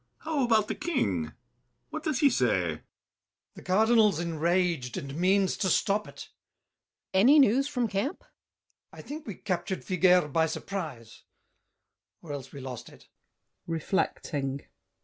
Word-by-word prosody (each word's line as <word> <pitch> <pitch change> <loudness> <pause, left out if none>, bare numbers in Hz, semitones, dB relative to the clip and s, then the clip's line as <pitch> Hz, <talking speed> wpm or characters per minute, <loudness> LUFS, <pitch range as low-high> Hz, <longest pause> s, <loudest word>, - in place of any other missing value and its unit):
How 310 -3 -1
about 220 -3 +3
the - - -2
King? 95 - -1 0.6
What 310 - -4
does 305 -5 -1
he 285 - +6
say? 125 - +2 0.3
GASSÉ. - - -23 0.7
The - - -12
Cardinal's 215 -1 +3
enraged 170 -5 0
And 140 0 -6
means 190 +3 +2
to 190 - 0
stop 205 +3 +1
it. - - -11
BOUCHAVANNES. 190 - -6
Any 275 +8 +7
news 270 0 +4
from 250 -5 -1
camp? 200 +8 -2
GASSÉ. - - -26
I - - -8
think 305 +1 -8
we 205 - -5
captured 185 0 -3
Figuère 180 -5 +3
by 160 0 +3
surprise— 155 - -6 1.0
Or 160 - -8
else 135 -2 -7
we 140 - -9
lost 130 -3 -7
it. - - -18 0.6
[Reflecting. 145 -4 -2
185 Hz, 145 wpm, -28 LUFS, 150-225 Hz, 1.0 s, Any